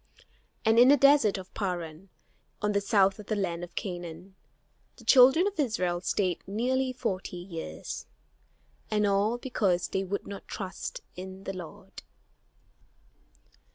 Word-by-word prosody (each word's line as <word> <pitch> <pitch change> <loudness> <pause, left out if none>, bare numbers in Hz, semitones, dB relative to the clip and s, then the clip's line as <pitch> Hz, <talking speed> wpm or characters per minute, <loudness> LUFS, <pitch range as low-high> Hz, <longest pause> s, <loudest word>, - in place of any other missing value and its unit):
And 225 +1 +5
in 245 - +8
the 285 +2 +7
desert 280 -8 +5
of 185 -1 -10
Paran, 175 -2 -4 0.5
on 210 - 0
the 200 -1 +1
south 195 -1 +3
of 210 - -10
the 215 - 0
land 175 -4 -2
of 175 - -9
Canaan, 175 0 -6 0.6
the - - -16
children 270 +7 +7
of 405 -4 -3
Israel 185 -10 0
stayed 185 -2 0
nearly 255 +6 0
forty 195 -8 -3
years; 165 - -7 0.8
and 210 -1 +2
all 205 +4 +2
because 200 -9 0
they 190 - -1
would 200 +1 -3
not 200 -1 -8
trust 190 -2 -5
in 190 +1 -8
the 195 - -4
Lord. 175 -4 -10
195 Hz, 140 wpm, -29 LUFS, 180-225 Hz, 0.8 s, in